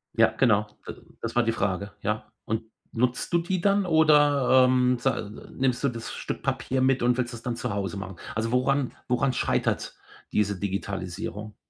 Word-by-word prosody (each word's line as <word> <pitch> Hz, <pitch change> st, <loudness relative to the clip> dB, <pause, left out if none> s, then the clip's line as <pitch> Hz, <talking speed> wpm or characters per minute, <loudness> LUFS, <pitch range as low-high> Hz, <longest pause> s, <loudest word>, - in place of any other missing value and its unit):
Ja, -, -, +5 dB
genau. 105 Hz, -4 st, +3 dB, 0.2 s
D -, -, -4 dB, 0.3 s
das 115 Hz, 0 st, -4 dB
war 120 Hz, -, +4 dB
die 115 Hz, -, +1 dB
Frage, 100 Hz, -2 st, -2 dB
ja. 105 Hz, +1 st, -3 dB
Und 110 Hz, +1 st, -2 dB, 0.3 s
nutzt 125 Hz, +6 st, -1 dB
du -, -, +6 dB
die 175 Hz, +1 st, -2 dB
dann 200 Hz, 0 st, +3 dB
oder, 145 Hz, -5 st, +5 dB
ähm, 125 Hz, 0 st, +3 dB
sa 135 Hz, -, 0 dB
nimmst 125 Hz, +4 st, -2 dB
du 140 Hz, -, +3 dB
das 115 Hz, -1 st, -6 dB
Stück -, -, -5 dB
Papier 130 Hz, 0 st, -1 dB
mit 130 Hz, -1 st, +2 dB
und 125 Hz, +1 st, +3 dB
willst 120 Hz, -1 st, -2 dB
es 115 Hz, -, -9 dB
dann 120 Hz, -1 st, -2 dB
zu 125 Hz, 0 st, -3 dB
Hause 100 Hz, -1 st, -3 dB
machen? 95 Hz, -2 st, -6 dB, 0.2 s
Also 110 Hz, +1 st, -1 dB
woran 130 Hz, +1 st, +1 dB, 0.2 s
woran 125 Hz, +1 st, +1 dB
scheitert -, -, -1 dB, 0.4 s
diese 100 Hz, -2 st, 0 dB
Digitalisierung? 100 Hz, +2 st, -4 dB
120 Hz, 180 wpm, -26 LUFS, 105-130 Hz, 0.4 s, du